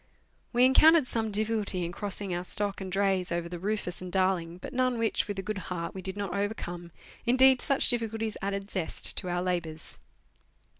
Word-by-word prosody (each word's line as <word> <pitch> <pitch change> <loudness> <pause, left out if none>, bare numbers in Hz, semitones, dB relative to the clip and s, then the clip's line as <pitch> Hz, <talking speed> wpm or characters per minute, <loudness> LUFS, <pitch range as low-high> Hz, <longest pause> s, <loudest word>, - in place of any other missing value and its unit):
We 245 +1 +5
encountered 310 +3 +6
some 225 -3 -2
difficulty 210 -3 -1
in 170 - -4
crossing 200 0 -2
our 175 +1 -2
stock 205 +1 -3
and 190 -1 -5
drays 195 -2 +1
over 170 0 -1
the 175 0 -7
Rufns 195 -2 -2
and 180 -1 -7
Darling, 185 -3 +1
but - - -9
none 255 -1 +1
which, 225 -2 0
with 205 -1 -4
a 195 - -3
good 210 0 -3
heart, 170 -2 -4
we 190 - -6
did 190 +2 -6
not 200 -3 -3
overcome; 180 -4 -4 0.3
indeed, 260 +1 +5
such 275 - +4
difficulties 225 -2 -1
added 200 0 -3
zest 180 -5 0
to 185 - -3
our 175 0 -1
labours. 170 -4 -4
195 Hz, 190 wpm, -29 LUFS, 180-220 Hz, 0.3 s, encountered